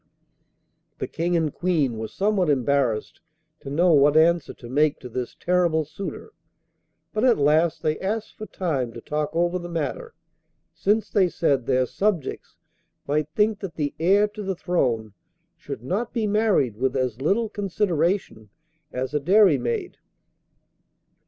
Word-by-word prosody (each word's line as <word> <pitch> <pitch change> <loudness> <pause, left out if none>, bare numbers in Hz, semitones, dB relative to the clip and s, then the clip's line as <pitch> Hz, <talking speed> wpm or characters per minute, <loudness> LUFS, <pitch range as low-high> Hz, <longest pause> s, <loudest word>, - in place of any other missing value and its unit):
The - - -3
King 170 +1 -1
and 155 -3 0
Queen 160 -9 0
were 110 - -3
somewhat 195 - 0
embarrassed 130 -5 0 0.4
to 135 - -9
know 170 +4 +3
what 145 +1 +5
answer 170 0 +3
to 120 - -12
make 145 +4 +2
to 125 - -8
this 125 +1 -5
terrible 175 -3 +1
suitor, 200 - -7 0.8
but 215 - -1
at 255 -2 +5
last 155 +3 +2
they 155 -1 0
asked 215 +3 -3
for 215 - -8
time 145 -11 -2
to 115 - -8
talk 150 +3 -2
over 175 +2 0
the 175 0 -7
matter: 175 - -4 0.6
since, 210 +2 +1
they 190 -4 +3
said, 140 -8 0
their 130 -1 +2
subjects 195 - -2 0.5
might 150 +1 0
think 210 0 +2
that 190 -5 -7
the 145 -2 -2
heir 195 +5 +4
to 210 +1 -8
the 190 -2 -2
throne 120 - -1 0.4
should 115 - -8
not 205 - -2
be 230 -3 0
married 205 - +1
with 130 +3 0
as 130 -2 -2
little 205 +10 +1
consideration 185 - -1 0.4
as 130 +2 -4
a 150 - +2
dairymaid. 150 - +2
165 Hz, 150 wpm, -24 LUFS, 140-195 Hz, 0.8 s, what